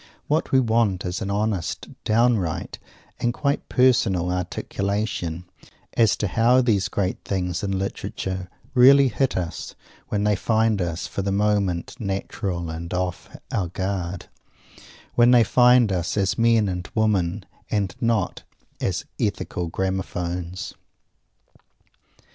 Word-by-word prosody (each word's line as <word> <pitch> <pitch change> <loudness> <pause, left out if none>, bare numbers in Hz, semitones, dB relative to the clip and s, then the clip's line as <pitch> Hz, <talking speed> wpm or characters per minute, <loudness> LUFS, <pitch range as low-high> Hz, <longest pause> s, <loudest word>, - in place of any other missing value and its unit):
What 155 +2 0
we 130 - +5
want 110 -6 +1
is 90 +1 -3
an 100 - -3
honest, 100 -3 -1 0.2
downright 110 -7 +1 0.4
and 120 - +1
quite 140 +3 -1
personal 105 -9 +3
articulation, 90 -1 -2 0.5
as 115 -3 +4
to 105 - -1
how 115 +6 +4
these 110 -6 +2
great 95 -2 -2
things 90 -3 -2
in 95 -1 -1
literature 95 -1 -4 0.2
really 135 +1 +7
hit 130 +3 0
us 85 -2 -4 0.3
when 105 -1 -1
they 105 0 +3
find 110 0 +1
us 85 -1 -2
for - - -4
the 100 0 -1
moment 100 -2 0
natural 95 -4 -3
and 85 +1 -6
off 90 -1 -3 0.2
our 95 - 0
guard 95 -1 -3 0.9
when 120 0 +5
they 120 -2 +7
find 125 -1 +5
us 90 +2 -1
as 100 -1 +1
men 115 -2 +3
and 90 -1 -4
women, 100 -3 +1 0.2
and 100 -4 -1
not 115 -4 0 0.4
as 90 -2 -2
ethical 100 -5 -2
gramaphones. 90 -1 -3
100 Hz, 125 wpm, -23 LUFS, 90-115 Hz, 0.9 s, really